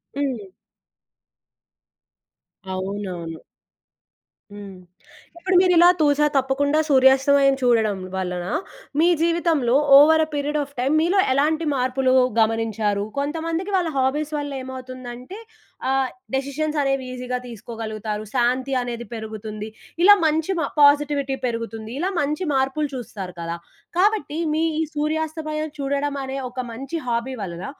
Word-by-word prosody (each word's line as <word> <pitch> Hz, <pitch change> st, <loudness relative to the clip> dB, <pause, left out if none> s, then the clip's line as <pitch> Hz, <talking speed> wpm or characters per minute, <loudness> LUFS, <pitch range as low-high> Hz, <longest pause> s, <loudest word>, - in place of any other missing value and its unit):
హ్మ్. 260 Hz, -8 st, -2 dB, 2.3 s
అవునవును. 185 Hz, -4 st, -5 dB, 1.1 s
హ్మ్. 200 Hz, -2 st, -9 dB, 0.6 s
ఇప్పుడు 370 Hz, +2 st, -1 dB
మీరిలా 355 Hz, -2 st, +6 dB
తూస 290 Hz, -1 st, +3 dB, 0.2 s
తప్పకుండా 275 Hz, +3 st, +2 dB
సూర్యాస్తమయం 270 Hz, +1 st, +5 dB
చూడడం 225 Hz, -5 st, +2 dB, 0.2 s
వలన 180 Hz, -2 st, -3 dB, 0.5 s
మీ 335 Hz, -, +5 dB
జీవితంలో 330 Hz, -7 st, +2 dB, 0.2 s
over 315 Hz, +3 st, +7 dB
a -, -, -17 dB
period 295 Hz, +1 st, -1 dB
of 285 Hz, -1 st, -4 dB
time 265 Hz, +4 st, +1 dB
మీలో 355 Hz, +5 st, +2 dB
ఎలాంటి 310 Hz, +4 st, +1 dB
మార్పులు 260 Hz, 0 st, +1 dB, 0.3 s
గమనించారు? 220 Hz, -2 st, +1 dB
కొంతమందికి 325 Hz, +6 st, -2 dB
వాళ్ళ 355 Hz, -3 st, +1 dB
హాబీస్ 290 Hz, +3 st, 0 dB
వల్లేమవుతుందంటే 260 Hz, +1 st, -7 dB, 0.5 s
ఆహ్ 265 Hz, -1 st, +1 dB, 0.3 s
డెసిషన్స్ 290 Hz, +3 st, -2 dB
అనేవి 270 Hz, -2 st, 0 dB
ఈజీగా 250 Hz, 0 st, -3 dB
తీసుకోగలుగుతారు. 220 Hz, -2 st, -5 dB
శాంతి 255 Hz, +2 st, +1 dB
అనేది 240 Hz, -1 st, -5 dB
పెరుగుతుంది. 215 Hz, -1 st, -6 dB, 0.3 s
ఇలా 410 Hz, +2 st, +9 dB
మంచి 315 Hz, +3 st, +1 dB
మ -, -, 0 dB, 0.2 s
పాజిటివిటీ 285 Hz, -1 st, +4 dB
పెరుగుతుంది. 230 Hz, -2 st, -4 dB
ఇలా 370 Hz, +4 st, 0 dB
మంచి 300 Hz, +5 st, -1 dB
మార్పులు 270 Hz, +3 st, 0 dB
చూస్తారు 200 Hz, -7 st, -7 dB
కదా! 170 Hz, 0 st, -4 dB, 0.4 s
కాబట్టి 375 Hz, -6 st, +1 dB, 0.2 s
మీ 315 Hz, +1 st, +1 dB, 0.2 s
ఈ -, -, +2 dB
సూర్యాస్తమయం 310 Hz, 0 st, -2 dB
చూడడం 280 Hz, +1 st, -1 dB
అనే 265 Hz, +1 st, -4 dB
ఒక 255 Hz, -, -8 dB
మంచి 270 Hz, +8 st, -5 dB
హాబీ 240 Hz, +2 st, -1 dB
వలన 175 Hz, -2 st, -5 dB
270 Hz, 115 wpm, -22 LUFS, 230-300 Hz, 2.3 s, ఇలా